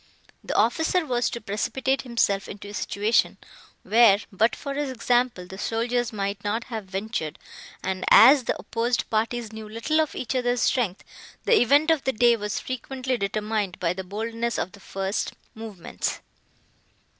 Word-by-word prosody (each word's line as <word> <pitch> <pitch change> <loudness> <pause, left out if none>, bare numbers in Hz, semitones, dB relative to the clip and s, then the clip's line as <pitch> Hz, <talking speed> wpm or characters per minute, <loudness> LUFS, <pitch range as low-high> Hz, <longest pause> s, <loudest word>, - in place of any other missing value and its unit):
The - - -4
officer 320 - +2
was 245 -3 0
to 235 - -5
precipitate 250 +5 -1
himself 230 -6 0
into 205 0 -8
a - - -9
situation, 210 +2 +1 0.5
where, 225 -2 +6
but 215 +4 +2
for 280 -2 -5
his 290 0 -2
example, 240 -5 0
the 190 +2 -10
soldiers 235 +2 -1
might 200 -1 -3
not 215 +3 -1
have 220 -4 -6
ventured; 190 -4 -4 0.5
and, 185 0 -2
as 260 +2 +8
the - - -1
opposed 235 +1 -1
parties 225 0 -1
knew 220 -1 -8
little 230 +9 +1
of 310 - -3
each 255 0 -3
other's 245 -1 +1
strength, 225 -8 0 0.4
the 470 - +5
event 285 +6 +4
of 315 -4 +1
the 265 - 0
day 240 +1 +4
was 210 -2 -3
frequently 255 +1 -3
determined 210 -2 -2
by 175 -1 +1
the 190 +1 -6
boldness 225 +4 -3
of 185 - -2
the 200 - -15
first 195 +1 -3 0.2
movements. 220 -5 -5
225 Hz, 160 wpm, -25 LUFS, 205-245 Hz, 0.5 s, as